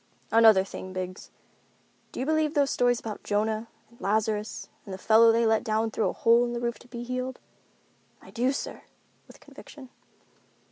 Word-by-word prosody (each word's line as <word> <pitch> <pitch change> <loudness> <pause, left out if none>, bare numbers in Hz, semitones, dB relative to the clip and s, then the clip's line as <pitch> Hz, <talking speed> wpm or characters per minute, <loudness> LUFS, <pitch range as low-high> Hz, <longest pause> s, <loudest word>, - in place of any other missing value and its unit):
"Another 220 -4 +6
thing, 185 -1 -8
Biggs, 185 0 -6 0.8
do - - -8
you 260 - -1
believe 315 0 +1
those 280 -2 +2
stories 245 -1 +2
about 215 -2 -7
Jonah, 215 +2 -1 0.2
and 235 - -22
Lazarus, 215 +1 -1 0.2
and 200 - -10
the 190 - -5
fellow 225 +4 +5
they 230 +1 +2
let 220 -1 +2
down 220 +1 0
through 215 - 0
a - - -4
hole 235 +1 +4
in 240 0 -2
the 240 - -3
roof 235 -1 -3
to - - -17
be 240 -1 -7
healed?" 255 +1 -4 0.8
"I - - -16
do, 250 +2 +1
sir," 275 - -5 0.5
with - - -16
conviction. 270 -4 -14
230 Hz, 180 wpm, -27 LUFS, 215-245 Hz, 0.8 s, Another